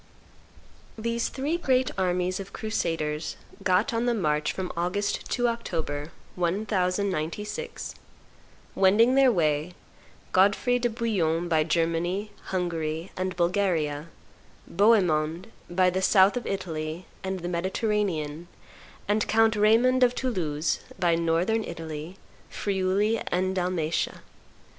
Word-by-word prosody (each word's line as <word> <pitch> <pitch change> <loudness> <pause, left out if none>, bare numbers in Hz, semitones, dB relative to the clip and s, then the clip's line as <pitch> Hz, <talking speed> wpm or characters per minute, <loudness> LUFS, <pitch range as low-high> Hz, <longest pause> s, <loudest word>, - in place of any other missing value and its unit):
These 230 +1 -1
three 290 +5 -1
great 260 -6 +1
armies 180 0 0
of 195 - -8
crusaders 165 -8 -2 0.2
got 185 +5 +2
on 230 +1 0
the 240 - +2
march 150 -7 0
from 185 -1 -4
August 180 +4 -1
to 245 0 +2
October, 165 -10 -3 0.2
1096, 190 - -2 0.8
wending 210 +6 +5
their 270 -1 +6
way, 155 -3 0 0.6
Godfrey 205 +6 +3
de 240 0 +1
Bouillon 185 -8 0
by 160 -2 +3
Germany, 170 +5 0
Hungary, 165 -2 -2
and 185 0 -2
Bulgaria; 170 -4 0 0.6
Bohemond 180 -3 +2 0.2
by 180 +1 +3
the 190 +1 -1
south 190 +2 +5
of 245 - -3
Italy 165 -2 -4 0.2
and 190 -1 -3
the 175 - -4
Mediterranean; 175 -3 -1 0.6
and 210 +1 +1
Count 225 0 +4
Raymond 230 +5 +4
of 250 -1 +4
Toulouse 165 - -1 0.2
by 175 -2 +2
Northern 170 +7 +1
Italy, 160 +1 -7 0.3
Friuli, 200 +3 0
and 185 +1 0
Dalmatia. 175 -3 -1
185 Hz, 110 wpm, -27 LUFS, 165-215 Hz, 0.8 s, their